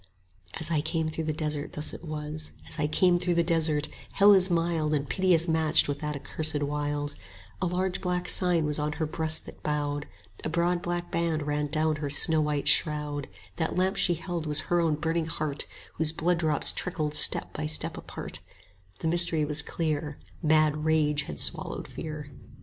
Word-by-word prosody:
As 160 +1 -4
I 155 -2 +2
came 160 0 -1
through 160 0 -3
the 155 - 0
desert 150 -1 -3
thus 150 +1 -2
it - - -9
was, 155 -1 -5
As 160 - -3
I 150 - +1
came 175 +3 +3
through 175 0 0
the 170 - +3
desert: 160 -3 +2 0.3
Hell 205 +1 +7
is 190 -1 +4
mild 165 -3 +1
80 - - +3
And 140 - -7
piteous 175 +2 +2
matched 160 -1 +4
with 145 0 -3
that 150 0 -3
accursed 150 +1 -1
wild; 145 0 -2 0.5
A 185 - +1
large 180 +1 -1
black 180 -1 -1
sign 175 -4 +3
was 150 0 -1
on 150 0 -1
her 160 - -2
breast 160 +1 +1
that - - -12
bowed, 145 -1 -2 0.4
A - - -2
broad 175 +2 +1
black 175 0 -3
band 165 -3 0
ran 150 0 -1
down 155 +1 0
her 145 -1 -3
snow 155 +2 +4
white 150 -1 -1
shroud; 150 0 +1 0.3
That 160 -1 -1
lamp 190 +2 +1
she 180 -3 +2
held 170 -1 -4
was 150 +1 +4
her 175 +1 +1
own 160 -2 +2
burning 160 +1 -1
heart, 155 -3 -1 0.3
Whose 160 -1 +2
blood 170 +1 +1
drops 155 -3 +2
trickled 155 -4 -2
step - - +4
by 155 0 -3
step 155 - -2
apart: - - -7 0.6
85 - - -20
The - - -1
mystery 165 -2 +2
was 150 0 +3
clear; 150 -2 -3 0.2
Mad 155 -1 +3
rage 150 -2 +2
had 70 - -6
swallowed - - -1
fear. 155 -3 -7
155 Hz, 195 wpm, -28 LUFS, 150-170 Hz, 0.6 s, Hell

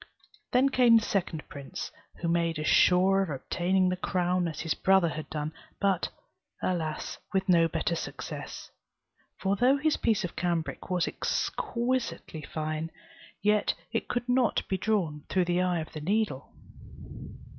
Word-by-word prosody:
Then 260 +2 +4
came 245 -3 +6
the 225 - +1
second 175 -5 -2
prince, 140 -1 -7 0.2
who 170 - -4
made 170 -1 +1
as 155 - -3
sure 190 +4 +5
of 190 - -1
obtaining 180 +6 +1
the 180 - 0
crown 180 -1 0
as 160 -2 -4
his 165 - 0
brother 190 -3 +4
had 155 0 -6
done; 150 0 -3 0.3
but, 195 -3 +1 0.5
alas! 160 -4 -2
with 190 0 +1
no 170 -3 +5
better 165 +1 -1
success: - - -6 0.7
for 195 +1 +1
though 255 +6 +4
his 305 +2 +1
piece 215 -3 +1
of 180 - -4
cambric 170 -5 -2
was 180 -2 +1
exquisitely 240 - -2
fine, 155 +2 -3 0.5
yet 210 0 +3 0.2
it - - -1
could 245 0 -2
not 250 -2 +2
be 190 - 0
drawn 180 -7 0
through 185 -1 +2
the 175 +1 +1
eye 180 -2 +1
of 155 - -9
the 155 - -6
needle. 195 -5 -1
180 Hz, 155 wpm, -29 LUFS, 165-205 Hz, 0.7 s, came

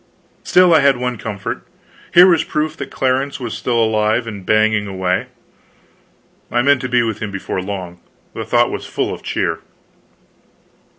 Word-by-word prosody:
Still, 180 -1 +5
I 160 - +6
had 140 -2 +4
one 125 -2 -3
comfort 100 -3 -5 0.5
here 175 +1 +8
was 170 -4 +4
proof 155 +1 -2
that 140 - -6
Clarence 135 +2 -1
was 120 -4 -5
still 120 -2 -1
alive 110 +1 +1
and 105 -4 -7
banging 110 +1 +2
away. 95 -1 -1 1.2
I 120 0 +1
meant 140 -2 +3
to 130 - -4
be 120 -1 +3
with 110 -2 -3
him 105 - -4
before 95 -1 -4
long; 90 -3 -6 0.3
the - - -5
thought - - +2
was - - -5
full - - -2
of - - -8
cheer. - - -2
115 Hz, 165 wpm, -18 LUFS, 105-135 Hz, 1.2 s, here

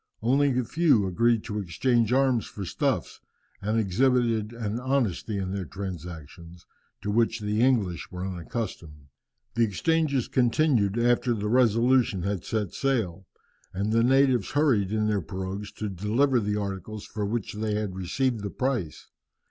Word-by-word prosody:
Only 135 +2 +3
a 125 - +2
few 145 - +3
agreed 115 +4 +2
to 105 -2 -4
exchange 115 +6 +1
arms 130 -3 +2
for 100 - -7
stuffs, - - -1 0.4
and 105 +3 0
exhibited 115 +1 +1
an 115 -1 -3
honesty 120 -6 -1
in 95 -1 -3
their 100 -1 -2
transactions 85 -2 -8 0.4
to 105 - -1
which 115 +1 +2
the 105 +1 -1
English 110 -10 +1
were 90 0 -5
unaccustomed. 85 - -6 0.4
The 115 - +2
exchanges 140 - +1
continued 120 -4 +2
after 120 0 +2
the 105 -1 -3
Resolution 120 -3 +3
had 100 -2 -2
set 105 -5 -2
sail, 105 -9 -1 0.5
and 100 +3 -1
the 115 0 +4
natives 130 -5 +3
hurried 130 -10 +2
in 110 0 +1
their 105 -2 +1
pirogues 95 +4 -5
to 110 - -4
deliver 110 +8 +1
the 105 -1 -1
articles 100 +1 -5
for 105 - -5
which 105 +1 -2
they 105 0 -2
had 105 -3 -3
received 115 +6 -1
the 100 - -3
price. 120 - -2
110 Hz, 150 wpm, -26 LUFS, 95-125 Hz, 0.5 s, the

